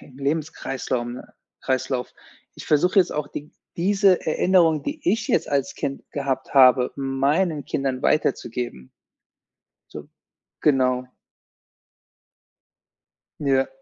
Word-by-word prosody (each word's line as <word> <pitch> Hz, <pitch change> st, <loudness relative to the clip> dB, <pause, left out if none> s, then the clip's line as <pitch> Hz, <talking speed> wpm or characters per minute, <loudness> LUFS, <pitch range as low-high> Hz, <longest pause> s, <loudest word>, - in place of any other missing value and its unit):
im 135 Hz, 0 st, -16 dB
Lebenskreislaum 135 Hz, -5 st, -3 dB
ne -, -, -12 dB, 0.3 s
Kreislauf, 130 Hz, -1 st, -2 dB, 0.4 s
ich -, -, -10 dB
versuche 180 Hz, +7 st, +3 dB
jetzt 180 Hz, -, +3 dB
auch 150 Hz, -1 st, -3 dB
d 150 Hz, +1 st, -8 dB, 0.3 s
diese 195 Hz, +1 st, +3 dB
Erinnerung, 165 Hz, -1 st, +3 dB
die 300 Hz, +2 st, -5 dB
ich 225 Hz, +3 st, 0 dB
jetzt -, -, +1 dB
als 140 Hz, -1 st, -1 dB
Kind 140 Hz, 0 st, -4 dB
gehabt 135 Hz, -2 st, -3 dB
habe, 130 Hz, -2 st, +6 dB
meinen 140 Hz, +4 st, 0 dB
Kindern 135 Hz, -1 st, -2 dB
weiterzugeben. 120 Hz, -, -1 dB, 1.0 s
So, -, -, -9 dB, 0.5 s
genau. 130 Hz, -3 st, +2 dB, 2.3 s
Ja. 135 Hz, -2 st, +2 dB
140 Hz, 105 wpm, -23 LUFS, 130-160 Hz, 2.3 s, habe